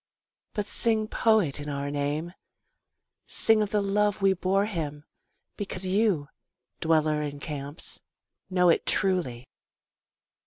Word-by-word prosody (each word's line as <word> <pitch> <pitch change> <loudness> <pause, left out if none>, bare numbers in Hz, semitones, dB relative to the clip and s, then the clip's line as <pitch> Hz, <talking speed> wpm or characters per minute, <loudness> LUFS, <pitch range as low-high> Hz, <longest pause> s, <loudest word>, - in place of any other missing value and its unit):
But 210 - -1
sing 220 0 +1
poet 215 -12 +2
in 145 0 -6
our 140 0 -3
name, 145 +4 -2 0.9
Sing 220 -1 +4
of 210 - 0
the 210 -1 +1
love 205 +1 +1
we 195 -1 +4
bore 190 +2 +1
him 150 -7 -4 0.5
because 190 -2 -1
you, 185 -6 +2 0.5
dweller 155 -2 +2
in 145 -1 -5
camps, 145 +1 -4 0.5
know 180 -1 +3
it 165 - +2
truly. 160 -11 0
180 Hz, 120 wpm, -27 LUFS, 145-205 Hz, 0.9 s, Sing